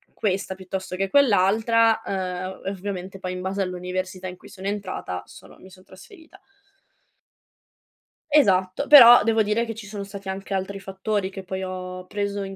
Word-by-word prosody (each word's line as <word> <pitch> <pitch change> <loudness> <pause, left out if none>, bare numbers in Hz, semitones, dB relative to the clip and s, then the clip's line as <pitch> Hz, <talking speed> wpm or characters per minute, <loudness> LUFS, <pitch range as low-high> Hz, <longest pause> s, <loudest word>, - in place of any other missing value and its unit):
questa 195 -2 -2
piuttosto 190 0 -6
che 195 +1 -2
quell'altra, 225 -2 +3
ehm, 185 -1 -4
e 195 - -1
ovviamente 190 -1 -6
poi 185 -1 -4
in 180 - -6
base 190 +2 -2
all'università 185 0 -4
in 180 - -7
cui - - -16
sono 190 0 -11
entrata 190 - -4
sono - - -15
mi 190 - -15
son 185 0 -17
trasferita. 325 - -16 1.9
Esatto, 190 -4 +3
però 245 -5 +10
devo 225 0 +2
dire 215 +3 0
che 225 -1 -6
ci 220 -1 -9
sono 200 0 -6
stati 195 -1 -9
anche 195 +1 -5
altri 195 +1 -3
fattori 195 +1 -3
che 195 0 -9
poi 190 0 -5
ho 185 0 -6
preso 200 0 -3
in 195 0 -7
195 Hz, 165 wpm, -24 LUFS, 185-210 Hz, 1.9 s, però